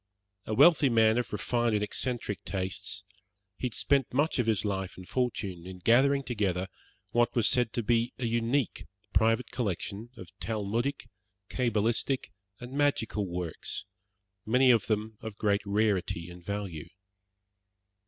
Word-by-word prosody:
A 110 Hz, -, -1 dB
wealthy 155 Hz, 0 st, +6 dB
man 110 Hz, 0 st, +4 dB
of 120 Hz, -, -3 dB
refined 120 Hz, +2 st, 0 dB
and 105 Hz, -, +1 dB
eccentric 115 Hz, -1 st, -3 dB
tastes, 95 Hz, -1 st, -3 dB, 0.5 s
he 125 Hz, -, -2 dB
had 120 Hz, -, -5 dB
spent 140 Hz, -3 st, +2 dB
much 145 Hz, +2 st, +1 dB
of 120 Hz, -, +1 dB
his 110 Hz, -2 st, +1 dB
life 95 Hz, -2 st, -2 dB
and 95 Hz, -1 st, -10 dB
fortune 100 Hz, -8 st, -2 dB
in 95 Hz, 0 st, -8 dB
gathering 135 Hz, +8 st, +4 dB
together 95 Hz, -6 st, -1 dB, 0.4 s
what 120 Hz, 0 st, +2 dB
was 115 Hz, -4 st, +4 dB
said 120 Hz, -3 st, +2 dB
to 120 Hz, -, -1 dB
be 120 Hz, +2 st, +2 dB
a 130 Hz, -, -3 dB
unique 115 Hz, +2 st, 0 dB, 0.3 s
private 115 Hz, +2 st, +2 dB
collection 105 Hz, 0 st, -3 dB
of 90 Hz, -6 st, -10 dB
Talmudic, 115 Hz, +5 st, -2 dB, 0.4 s
cabalistic, 120 Hz, +2 st, 0 dB, 0.3 s
and 125 Hz, +1 st, -8 dB
magical 135 Hz, -8 st, +1 dB
works, 90 Hz, -2 st, -4 dB, 0.6 s
many 125 Hz, +3 st, +5 dB
of 115 Hz, -3 st, +3 dB
them 110 Hz, 0 st, -2 dB
of 110 Hz, -2 st, -7 dB
great 100 Hz, -2 st, +2 dB
rarity 100 Hz, -5 st, 0 dB
and 90 Hz, 0 st, -12 dB
value. 95 Hz, -5 st, -4 dB
110 Hz, 145 wpm, -29 LUFS, 100-125 Hz, 0.6 s, wealthy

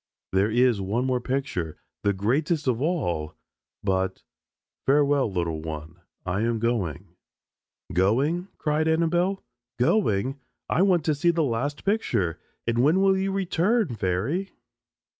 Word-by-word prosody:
There 95 Hz, +3 st, +2 dB
is 120 Hz, -2 st, +3 dB
one 110 Hz, +7 st, -1 dB
more 130 Hz, -1 st, 0 dB
picture 125 Hz, -, -2 dB, 0.2 s
the 100 Hz, -, +2 dB
greatest 140 Hz, -, 0 dB
of 125 Hz, -1 st, +1 dB
all, 90 Hz, -, -1 dB, 0.5 s
but 95 Hz, -1 st, -1 dB, 0.6 s
farewell, 140 Hz, -3 st, +3 dB
little 85 Hz, -4 st, -2 dB
one, 80 Hz, +2 st, -7 dB, 0.2 s
I 95 Hz, +3 st, -1 dB
am 115 Hz, 0 st, +1 dB
going." 110 Hz, -, -1 dB, 0.8 s
"Going?" 135 Hz, -, +2 dB
cried 155 Hz, +1 st, 0 dB
Annabelle. 175 Hz, +4 st, +1 dB, 0.3 s
"Going? 130 Hz, -, +1 dB, 0.3 s
I 175 Hz, -, +1 dB
want 180 Hz, -5 st, +3 dB
to 155 Hz, -, +3 dB
see 145 Hz, +4 st, +1 dB
the 170 Hz, -1 st, +2 dB
last 140 Hz, +3 st, -2 dB
picture 120 Hz, -, 0 dB, 0.3 s
and 115 Hz, 0 st, 0 dB
when 150 Hz, +9 st, +4 dB
will 195 Hz, 0 st, +4 dB
you 190 Hz, +1 st, 0 dB
return, 195 Hz, +2 st, +1 dB
fairy?" 110 Hz, -, -1 dB
130 Hz, 130 wpm, -26 LUFS, 95-165 Hz, 0.8 s, when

